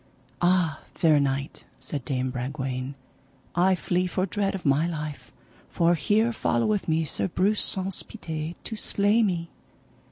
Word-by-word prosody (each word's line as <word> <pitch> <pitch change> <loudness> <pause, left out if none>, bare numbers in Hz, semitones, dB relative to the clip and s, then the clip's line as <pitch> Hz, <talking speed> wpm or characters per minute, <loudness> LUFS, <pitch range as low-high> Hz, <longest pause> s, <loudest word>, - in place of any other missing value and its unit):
Ah, 175 -4 +3 0.2
fair 155 -3 +4
knight, 140 0 -1
said 145 -4 -4
Dame 130 -2 -1
Bragwaine, 130 +1 -3 0.6
I 185 +2 +4
flee 180 0 0
for 185 +1 0
dread 195 +1 -1
of 185 - -7
my 145 +4 +3
life, 155 -3 -5 0.4
for 170 0 +3
here 210 +9 +2
followeth 200 - +1
me 160 0 +2
Sir 150 - 0
Breuse 200 +4 +1
Saunce 190 0 -1
Pité 160 -5 -5
to 225 - -4
slay 210 +1 +2
me. 175 -6 0
170 Hz, 140 wpm, -26 LUFS, 140-190 Hz, 0.6 s, fair